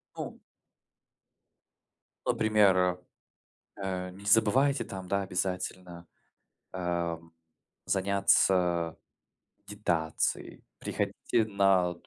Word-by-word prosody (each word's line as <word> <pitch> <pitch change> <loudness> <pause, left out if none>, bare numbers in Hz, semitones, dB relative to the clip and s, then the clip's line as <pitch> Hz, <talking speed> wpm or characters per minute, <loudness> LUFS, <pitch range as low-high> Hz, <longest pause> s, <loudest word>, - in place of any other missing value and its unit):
Ну. - - -6 1.9
Например, 105 -3 +4
э, 90 -1 +2 0.9
э: 90 -1 -3
"Не 100 +2 -13
забывайте 115 +7 +4
там, 95 -1 -8
да, 100 +2 0
обязательно, 90 -2 -4 0.6
а, 85 -2 -2
м, 80 0 -20 0.5
заняться 95 -3 +2 0.7
дитацией, 85 -7 -2 0.2
приходите 110 - -1
на". 95 -4 +2
95 Hz, 75 wpm, -29 LUFS, 90-100 Hz, 1.9 s, Например